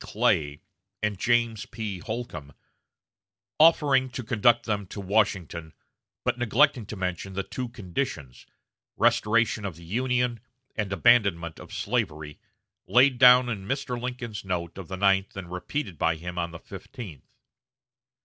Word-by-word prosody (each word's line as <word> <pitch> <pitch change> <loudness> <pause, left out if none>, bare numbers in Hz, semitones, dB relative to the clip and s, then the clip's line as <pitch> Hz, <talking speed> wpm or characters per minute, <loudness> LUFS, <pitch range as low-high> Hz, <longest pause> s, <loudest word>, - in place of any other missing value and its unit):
Clay 75 -1 0 0.4
and 105 -3 -1
James 115 -2 +1
P. 105 -5 -5
Holcombe, 90 - -6 1.1
offering 145 -5 +5
to 125 0 -6
conduct 120 0 +3
them 105 -3 -2
to 100 - -8
Washington, 95 -5 0 0.5
but 125 - 0
neglecting 120 -1 +3
to 110 - -6
mention 95 0 -4
the 100 +1 -2
two 125 +4 -5
conditions 90 - -5 0.5
restoration 110 0 +2
of 95 -5 -4
the 85 +1 -13
Union 125 +4 0 0.4
and 105 -2 -2
abandonment 95 -6 +3
of - - -12
slavery 80 -10 -2 0.5
laid 125 +4 +4
down 125 -1 +8
in 100 -5 -4
Mr. 135 -2 -2
Lincoln's 125 -4 -5
note 85 -3 -3
of 95 - -8
the 95 - -5
ninth 95 0 +2
and 90 -3 -7
repeated 90 - -4
by 80 0 +2
him 90 +2 -7
on 85 0 -1
the 85 - -9
fifteenth. 95 - -10
105 Hz, 140 wpm, -26 LUFS, 90-120 Hz, 1.1 s, down